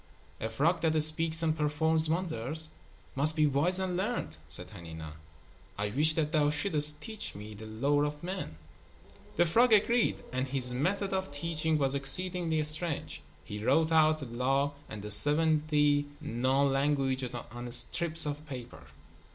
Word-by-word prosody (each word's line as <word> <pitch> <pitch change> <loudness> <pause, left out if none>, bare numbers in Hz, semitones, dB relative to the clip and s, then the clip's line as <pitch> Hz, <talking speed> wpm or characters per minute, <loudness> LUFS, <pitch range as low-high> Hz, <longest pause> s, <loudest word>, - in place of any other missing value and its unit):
"A 110 - -4
frog 150 +10 0
that 160 -1 +1
speaks 160 +1 +4
and 160 -1 +1
performs 155 +1 0
wonders 160 -3 -1 0.4
must 150 +3 +6
be 155 -2 +3
wise 150 +6 +1
and 185 -1 -2
learned," 190 - -3
said 85 +5 -2
Hanina. 80 -2 -9 0.7
"I 105 0 -2
wish 155 +6 +3
that 155 -2 -1
thou 150 -3 +2
shouldst 150 -1 +4
teach 220 -2 -3
me 105 +1 -9
the 110 +1 -10
lore 140 +7 0
of 150 +2 -4
men." 180 - -6 0.8
The 175 - +3
frog 235 +9 +3
agreed, 225 +2 +2
and 130 +1 -2
his 130 -2 0
method 195 +9 -1
of 190 -3 -2
teaching 160 +1 -1
was 135 -2 +1
exceedingly 160 +3 -2
strange. 150 +1 -1 0.2
He 105 0 -8
wrote 160 +7 +2
out 155 -1 +4
the - - -5
Law 135 +4 -1 0.2
and 105 -2 -8
the 105 - -6
seventy 150 +3 +2
known 135 0 0
languages 135 -3 -1
on 120 +1 -8
strips 160 +7 +2
of 145 0 -5
paper. 125 -4 -9
150 Hz, 155 wpm, -29 LUFS, 130-160 Hz, 0.8 s, must